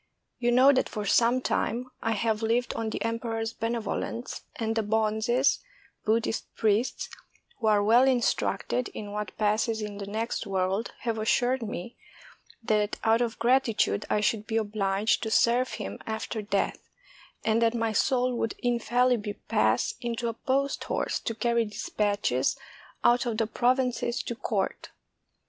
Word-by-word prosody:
You 240 0 +2
know 260 +3 +7
that 260 - +1
for 210 -1 -4
some 235 +5 +3
time 250 0 -1
I 225 - 0
have 220 0 0
lived 235 +2 +1
on 225 -1 -2
the - - -3
emperor's 230 0 -2
benevolence, 230 +1 -3
and 225 -1 -2
the 225 - +2
bonzes 220 +4 +2 0.5
[Buddhist 225 +1 0
priests], 220 +3 +1 0.5
who 225 - 0
are 210 -1 +4
well 235 +5 +6
instructed 250 0 +1
in 205 -1 -6
what 210 -2 -5
passes 220 +1 +1
in 210 -1 -5
the 200 - -5
next 220 +1 -3
world, 195 +3 -1
have 230 -2 -2
assured 245 +4 +2
me 225 +1 -6 0.7
that 210 -1 +1
out 225 +1 +3
of 235 -2 -1
gratitude 230 - +2
I 210 - +2
should 210 0 0
be 225 - 0
obliged 205 -1 +1
to 220 - -2
serve 240 +3 +3
him 100 +1 -5
after 220 0 -3
death, 200 -1 -1 0.7
and 225 +1 +2
that 230 0 +3
my 225 -1 0
soul 250 +3 +2
would 225 - -1
infallibly 240 -2 +1 0.2
pass - - +2
into 235 -1 -2
a - - -3
post 270 +4 -1
horse - - -1
to 230 - -4
carry 235 +1 +1
dispatches 205 - 0 0.5
out 240 +1 +4
of 225 -2 -1
the 225 - +2
provinces 250 +2 0
to - - -3
court. 240 - -2
225 Hz, 155 wpm, -28 LUFS, 215-240 Hz, 0.7 s, know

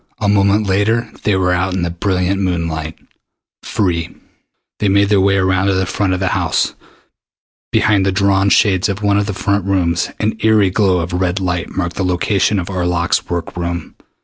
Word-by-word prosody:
A 105 - 0
moment 100 +1 +3
later, 100 +4 +2
and - - -17
they 105 - 0
were 90 -1 +1
out 90 +1 -1
in 90 - -1
the 85 - -1
brilliant 95 +2 -1
moonlight 85 -3 -2 0.7
free. 85 -4 -1 0.7
They 105 - +1
made 100 +1 +3
their 100 -2 +3
way 100 +1 +3
around 95 0 +1
to 100 - +2
the 95 0 0
front 95 +1 -1
of 90 - -2
the 95 -1 0
house. - - 0 1.0
Behind 100 -2 +2
the 95 - +1
drawn 100 0 +2
shades 95 -2 +3
of 100 +2 -4
one 100 0 +2
of 100 - -1
the 100 - -2
front 100 +1 -1
rooms 90 -3 0
an 110 +1 -1
eery 110 -3 +4
glow 95 -3 +2
of 85 +1 -5
red 90 +1 0
light 90 -2 -2
marked 85 -2 -4
the 95 - -1
location 95 +3 +1
of 90 -2 -3
Arlok's 90 -2 -1
work 85 -1 -4
room. 85 0 -4
95 Hz, 195 wpm, -16 LUFS, 90-100 Hz, 1.0 s, eery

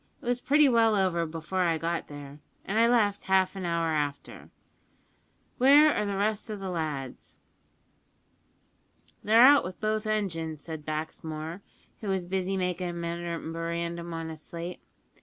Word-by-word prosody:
It - - -16
was 245 0 0
pretty 295 +1 +5
well 230 -3 +4
over 180 -4 +1
before 165 +4 -3
I 170 -2 +2
got 165 +1 -2
there, 145 0 -10 0.3
and 210 +3 0
I 230 - +6
left 210 -4 +2
half 190 0 +2
an 190 -2 -5
hour 170 -1 0
after. 145 -2 -3 1.1
Where 290 +4 +7
are 210 - -1
the 200 -1 -2
rest 215 +2 -1
o' 215 - -3
the 195 -2 -5
lads?" 150 -6 -5 1.9
"They're 225 +3 +6
out 285 +1 +7
wi' 185 0 -6
both 215 0 -1
engines," 165 -8 -2
said 160 -2 -8
Baxmore, 155 +2 -5 0.4
who 215 - -7
was 190 -2 -1
busy 190 +1 -1
making 180 -1 -1
a - - -5
memorandum 170 0 -4
on 165 -1 -5
a 160 - -8
slate. 170 +3 -7
175 Hz, 155 wpm, -28 LUFS, 165-210 Hz, 1.9 s, Where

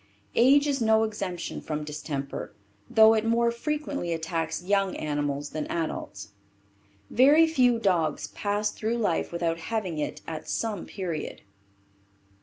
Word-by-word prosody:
Age 275 +4 +5
is 280 -3 0
no 220 0 +4
exemption 195 -5 -4
from 150 -1 -4
distemper, 145 -2 -5 0.3
though 220 0 +7
it 220 -1 +1
more 235 +1 +2
frequently 280 - -3
attacks 165 0 -3
young 195 0 +1
animals 145 -1 -2
than 155 -1 -3
adults. 155 -12 -4 0.8
Very 290 +6 +6
few 255 -7 +3
dogs 175 -8 +1
pass 205 +1 -1
through 225 +2 -2
life 205 -8 0
without 170 -1 -1
having 185 -3 -3
it 150 - -3
at 160 -1 -6
some 215 -5 -2
period. 175 -6 -5
195 Hz, 130 wpm, -27 LUFS, 160-230 Hz, 0.8 s, though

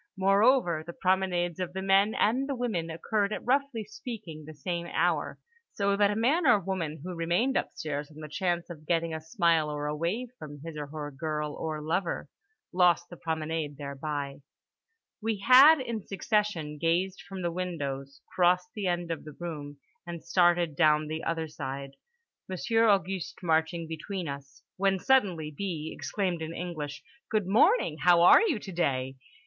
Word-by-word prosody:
Moreover 195 -3 +3
the 170 +2 -8
promenades 180 -2 0
of 180 -1 -3
the 190 - -3
men 195 +2 +4
and 260 +6 +1
the 275 - -1
women 215 -10 -2
occurred 200 +5 -1
at - - -4
roughly 265 -2 +1
speaking 210 - -8
the 155 - -9
same 170 +3 -3
hour, - - 0 0.4
so 200 -1 +1
that 200 0 +4
a 205 - -1
man 275 +9 +2
or 235 -5 +6
woman 170 -5 -3
who 180 +1 -5
remained 175 +11 0
upstairs 145 -1 -3
on 155 - -16
the 155 - -7
chance 175 +2 -2
of 155 -2 -11
getting 165 -1 +1
a 160 - -4
smile 160 -1 +2
or 150 0 -3
a 150 0 -2
wave 190 +11 -2
from 145 -1 -9
his 165 -1 -7
or 150 -1 -5
her 145 0 -6
girl 150 +1 -3
or 155 -1 -4
lover 170 +3 -1 0.5
lost 175 -1 +3
the - - -7
promenade 160 -3 -3
thereby…. 140 0 -5 0.8
We 220 0 -1
had 260 +9 +8
in 235 -4 -3
succession 195 -7 -1
gazed 175 +4 0
from 190 0 -7
the 170 - 0
windows, 140 -6 -4
crossed 180 0 +3
the 205 -3 -3
end 175 -1 -1
of 165 - -4
the 150 -2 -11
room, 150 -4 -6 0.3
and 170 -1 -6
started 175 -2 +3
down 150 +1 +3
the 160 +1 -4
other 165 -1 -2
side, 140 -2 -6 0.6
Monsieur 225 +5 +2
Auguste 190 -2 0
marching 160 0 +1
between 170 +3 -5
us—when 140 +8 -3
suddenly 185 -10 +2
B. 160 -4 -4
exclaimed 185 -5 -2
in 160 +1 -5
English 155 -5 -5 0.3
"Good 215 -3 +1
morning! 215 - +3
How 175 0 +5
are - - +8
you 395 - +1
today?" 135 -10 -2
175 Hz, 165 wpm, -29 LUFS, 155-195 Hz, 0.8 s, had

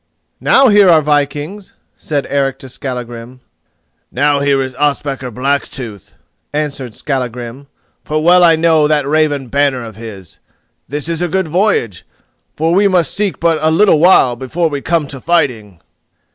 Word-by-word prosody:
"Now 270 -1 +4
here 205 -3 +5
are 165 -2 +6
vikings," 150 +6 -2 0.2
said 145 -3 -3
Eric 135 -1 -1
to 135 - -12
Skallagrim. 125 -1 -7 0.7
"Now 145 -1 +1
here 140 -1 +1
is 130 0 -6
Ospakar 140 -2 -2
Blacktooth," 125 -4 -4 0.4
answered 140 -5 -4
Skallagrim, 125 -1 -5 0.4
"for 155 0 -2
well 180 +2 +5
I 165 -2 +6
know 160 -2 +3
that 150 -2 +1
raven 145 -2 +1
banner 135 -1 0
of 110 -3 -11
his. 105 -6 -11 0.5
This 145 +2 -5
is 165 0 -3
a 175 - 0
good 190 +1 -1
voyage, 165 - 0 0.5
for 160 +2 0
we 200 +3 +4
must 180 -3 +1
seek 205 -2 -2
but 165 -1 +1
a 155 - +2
little 165 0 +4
while 155 -8 +4
before 155 +7 -2
we 145 -2 -4
come 165 -1 0
to 135 -2 -8
fighting." 125 - -1
145 Hz, 155 wpm, -15 LUFS, 130-165 Hz, 0.7 s, are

